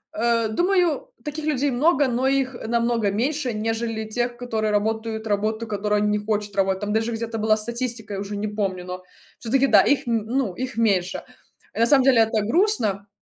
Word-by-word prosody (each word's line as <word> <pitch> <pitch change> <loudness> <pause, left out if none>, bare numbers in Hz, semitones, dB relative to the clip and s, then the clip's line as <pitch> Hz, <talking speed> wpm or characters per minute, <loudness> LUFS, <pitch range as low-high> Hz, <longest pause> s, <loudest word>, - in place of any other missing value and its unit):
Э, 230 0 +1
думаю, 355 - +1 0.2
таких 300 +1 -4
людей 285 -2 +1
много, 285 +2 +3
но 250 +2 0
их, 270 -1 +1
э, 220 - -7
намного 235 -2 +1
меньше, 260 +5 -1
нежели 225 0 -2
тех, 240 +2 -2
которые 220 -3 -2
работают 220 +1 -1
работу, 220 +2 -1
которую 210 0 0
они 210 - +2
не - - -3
хочет 210 -1 -2
работать. 190 0 +1
Там 205 +1 -2
даже 225 +1 0
где-то 225 0 -4
была 215 0 +3
статистика, 235 -1 -4
я 195 - -3
уже 205 +1 -5
не 215 - -2
помню, 195 -4 -3
но 185 0 -7 0.4
всё-таки, 265 +4 +2
да, - - +7
их, 285 -3 +1
м, 225 -2 0
ну, 245 -6 -1
их 255 +1 -5
меньше. 195 -6 +1 0.5
Э, - - -6
на 230 - +5
самом 280 -3 +5
деле, 260 -3 +5
это 220 -2 +1
грустно, 225 - +1
225 Hz, 195 wpm, -23 LUFS, 210-255 Hz, 0.5 s, да